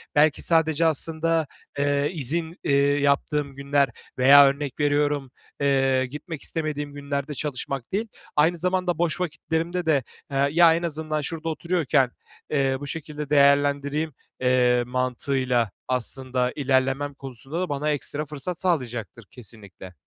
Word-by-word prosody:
belki 150 0 +4
sadece 160 -1 +3
aslında, 160 +1 0 0.3
eee, 145 0 +1
izin, 165 +3 -2
eee, 140 - +2 0.2
yaptığım 140 0 0
günler 140 0 +1 0.3
veya 140 +2 +8
örnek 140 0 -1
veriyorum, 145 -2 +1 0.3
eee, 135 -2 +2
gitmek 150 +3 -7
istemediğim 150 -3 -3
günlerde 140 0 -3
çalışmak 135 -2 -4
değil, 215 +4 -1 0.3
aynı 160 +4 +3
zamanda 180 0 0
boş 170 -1 0
vakitlerimde 170 +1 -2
de, 145 -5 +2 0.3
eee, 140 0 +2
"Ya, 165 +1 +6
en 170 - -3
azından 155 -2 -2
şurada 165 +2 -4
oturuyorken, 160 -6 +1 0.4
eee, 135 -2 +1
bu 145 - -7
şekilde 150 -1 -6
değerlendireyim." 145 +1 +3 0.3
eee, 125 -1 +3
mantığıyla 125 -2 0 0.2
aslında 125 0 -1
ilerlemem 135 0 +1
konusunda 135 +3 -7
da 185 - -2
bana 145 +1 0
ekstra 145 +1 -2
fırsat 150 +4 -5
sağlayacaktır 120 - -2
kesinlikle. 100 -6 -9
145 Hz, 130 wpm, -24 LUFS, 135-160 Hz, 0.4 s, veya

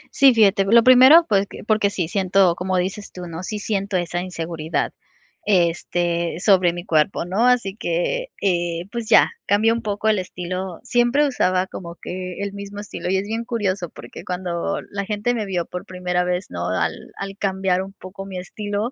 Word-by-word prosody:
Sí, 275 -1 +7
fíjate. 200 -3 +4
Lo 230 +3 +6
primero, 260 +6 +8
pues 200 -2 +2
que - - -10
porque 215 -2 +2
sí, 185 -4 -2
siento, 190 -1 +3
como 185 +1 -2
dices 195 +3 -3
tú, 180 -1 -8
¿no? 165 0 -6
Sí 210 +3 -4
siento 200 -2 -1
esa 175 0 -2
inseguridad, 165 -3 -3 0.5
este, 170 -2 0
sobre 185 -3 +4
mi 175 +1 -7
cuerpo, 160 +1 +1
¿no? 200 +7 +1
Así 235 -6 +2
que, 220 - -1
eh, 175 -3 0
pues 235 -2 -5
ya, - - +6 0.2
cambió 220 +3 +3
un 235 - -3
poco 210 0 -2
el 210 - +2
estilo. 180 0 -5
Siempre 245 +4 +2
usaba 185 -8 +1
como 170 -2 -8
que 180 0 -6
el 200 0 -3
mismo 200 0 -8
estilo, 205 -3 -5
y 190 - +2
es 190 - -1
bien 225 +2 -2
curioso, 200 -7 -2
porque - - -11
cuando 180 0 -3
la 200 0 -3
gente 210 +3 -1
me 220 -3 -2
vio 180 -3 -1
por 180 - -7
primera 180 -1 -1
vez, 180 +1 -1
¿no?, 85 0 -4
al 80 -3 -2
al 195 0 -6
cambiar 190 -2 0
un 195 +1 -8
poco 195 0 -10
mi 190 -2 -7
estilo, 205 +4 -4
190 Hz, 190 wpm, -22 LUFS, 180-210 Hz, 0.5 s, primero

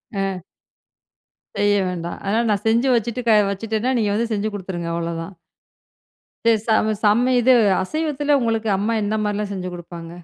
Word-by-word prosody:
ஆ. 195 -2 -2 1.2
செய்ய 205 0 +3
வேண்டாம். 170 -1 -5
ஆனா, 205 +3 +1
நான் 205 -1 0
செஞ்சு 230 +4 +3
வச்சுட்டு 235 +1 -1
க - - +6 0.2
வச்சிட்டேன்னா, 220 +4 -2
நீங்க 210 -2 +1
வந்து 230 +2 -1
செஞ்சு 215 +1 -1
குடுத்துருங்க, 180 -4 -5
அவ்ளோ 170 0 -3
தான். 165 +4 -8 1.1
செ 230 - +6 0.2
சம 220 -1 +2
செம்ம 235 +5 +3
இது 255 +2 +5 0.3
அசைவத்தில 295 +4 0
உங்களுக்கு 225 -2 0
அம்மா 215 +4 0
என்ன 205 +1 -1
மாரிலாம் 210 0 -2
செஞ்சு 185 -1 -4
குடுப்பாங்க? 170 -1 -9
210 Hz, 150 wpm, -21 LUFS, 190-230 Hz, 1.2 s, க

